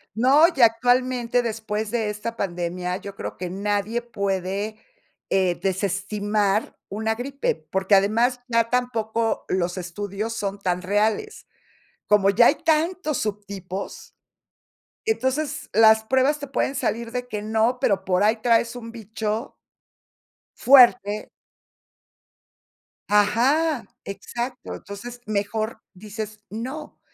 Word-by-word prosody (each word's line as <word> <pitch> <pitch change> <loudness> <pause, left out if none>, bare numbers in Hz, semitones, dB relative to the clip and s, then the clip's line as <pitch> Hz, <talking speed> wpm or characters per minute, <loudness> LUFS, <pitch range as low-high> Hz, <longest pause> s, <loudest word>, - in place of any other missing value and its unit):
No, 270 +8 +6
y - - -2
que 265 - +3
actualmente 245 +1 +3
después 220 -2 -3
de 225 -2 -1
esta 220 +3 -5
pandemia, 180 0 -2
yo 200 0 -9
creo - - -6
que 180 -1 -5
nadie 205 +4 -1
puede, 200 -1 -2 0.5
eh, 185 -3 +2
desestimar 200 +2 -1
una 220 +2 -1
gripe, 275 +4 -2 0.2
porque 190 +1 +3
además 230 +6 +2
ya 230 -1 +2
tampoco 230 -2 0
los 180 0 -1
estudios 200 +5 -4
son 200 -2 -3
tan 180 -1 -1
reales, 215 - -1 0.6
como 200 -1 +4
ya 235 +4 +6
hay - - +4
tantos 320 -1 0
subtipos, 200 -2 -6 0.9
entonces 300 -6 -1
las 220 0 +6
pruebas 265 +5 +2
te 285 - -6
pueden 270 0 -1
salir 230 -2 -2
de 250 0 -4
que 210 -1 -4
no, 220 +3 +1
pero 195 -2 +1
por 185 0 +1
ahí 220 +2 +3
traes 235 0 +2
un 230 -2 -8
bicho 220 +1 -4 1.0
fuerte. 240 -5 +5 1.8
Ajá, 250 +8 +3 0.2
exacto, 240 +5 -5
entonces, 240 +5 -9
mejor 215 +2 -2
dices 215 +2 -7
no, 260 +8 -6
220 Hz, 115 wpm, -24 LUFS, 200-245 Hz, 1.8 s, No